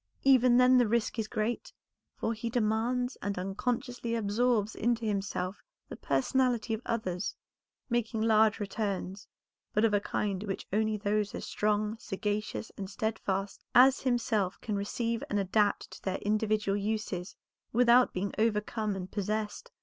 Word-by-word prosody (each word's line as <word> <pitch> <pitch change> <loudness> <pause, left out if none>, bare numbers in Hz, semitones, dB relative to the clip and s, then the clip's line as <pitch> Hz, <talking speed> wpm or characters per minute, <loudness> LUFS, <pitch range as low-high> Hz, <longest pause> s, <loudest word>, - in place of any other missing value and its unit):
Even 255 -2 +6
then 250 0 +6
the 245 - +4
risk 230 +1 0
is 215 - -1
great, 215 +3 -2 0.4
for 225 - -1
he 230 +1 -4
demands 240 +2 0
and 200 -1 -2
unconsciously 235 +5 -2
absorbs 220 0 +1
into 235 0 0
himself 195 -2 -2 0.3
the - - -6
personality 235 - +1
of 220 - -3
others, 190 -5 -2 0.5
making 235 -2 -1
large 220 -1 +4
returns, 200 -2 -3 0.5
but 210 +2 +3
of 220 - +2
a 205 - +4
kind 200 -1 -2
which 195 -2 -4
only 215 0 +1
those 205 0 -1
as - - -5
strong, 210 +1 0
sagacious, 210 0 -3
and 195 -1 -4
steadfast 200 -2 -2
as 260 +2 +7
himself 225 -7 0
can 215 - -3
receive 230 +3 -2
and 205 - 0
adapt 205 +1 +1
to - - -11
their 190 -1 -2
individual 210 -1 +1
uses, 205 -3 -3 0.4
without 245 +1 +5
being 195 +2 -3
overcome 215 -1 0
and 185 -1 -6
possessed. 210 +1 -3
215 Hz, 145 wpm, -30 LUFS, 200-235 Hz, 0.5 s, as